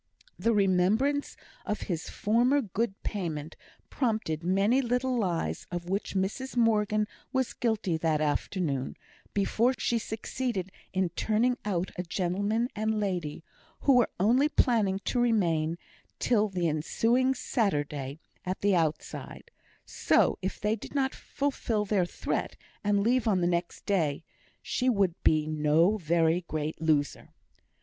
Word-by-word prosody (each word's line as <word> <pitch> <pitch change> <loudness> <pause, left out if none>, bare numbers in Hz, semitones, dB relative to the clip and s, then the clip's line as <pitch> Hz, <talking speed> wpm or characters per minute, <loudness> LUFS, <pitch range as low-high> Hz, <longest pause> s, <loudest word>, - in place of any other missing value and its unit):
The 230 - +2
remembrance 210 +8 +2 0.3
of 210 - -3
his 170 -3 -3
former 240 +7 +2
good 220 -3 -2
payment 160 -6 -4 0.4
prompted 215 - -1
many 200 +8 +3
little 250 +1 0
lies 180 -8 -1
of 175 0 -5
which 200 +1 -2
Mrs 215 +8 -2
Morgan 215 -2 +3 0.3
was 260 -2 0
guilty 220 -8 0
that 160 -1 +1
afternoon, 145 -2 -1 0.4
before 230 +5 +2
she 235 - 0
succeeded 220 -3 -3 0.2
in 185 -2 +1
turning 220 +8 +1
out 185 -3 -1
a - - 0
gentleman 200 +6 0
and 215 0 0
lady, 175 -7 -2 0.4
who 275 -3 +5
were 240 - +4
only 250 +10 +4
planning 220 -9 +2
to 250 - 0
remain 170 -9 +2 0.4
till 215 -3 +2
the 180 -3 0
ensuing 230 - +1
Saturday 145 - -1 0.2
at 185 +1 -4
the 200 -1 +3
outside, 160 -3 -3 0.3
so, - - +2
if 190 - -3
they 210 +1 +1
did 225 - -10 0.2
fulfil 240 -6 -2
their 195 -4 +1
threat, - - -3 0.3
and 205 -1 +2
leave 245 +1 +2
on 195 -4 +3
the 175 - +1
next 175 0 -2
day, 160 -7 0 0.4
she 255 0 0
would 200 -7 +2
be 155 -1 +3
no 155 +5 +3
very 170 0 +2
great 155 +1 -3
loser. 150 -3 0
200 Hz, 135 wpm, -29 LUFS, 170-230 Hz, 0.4 s, who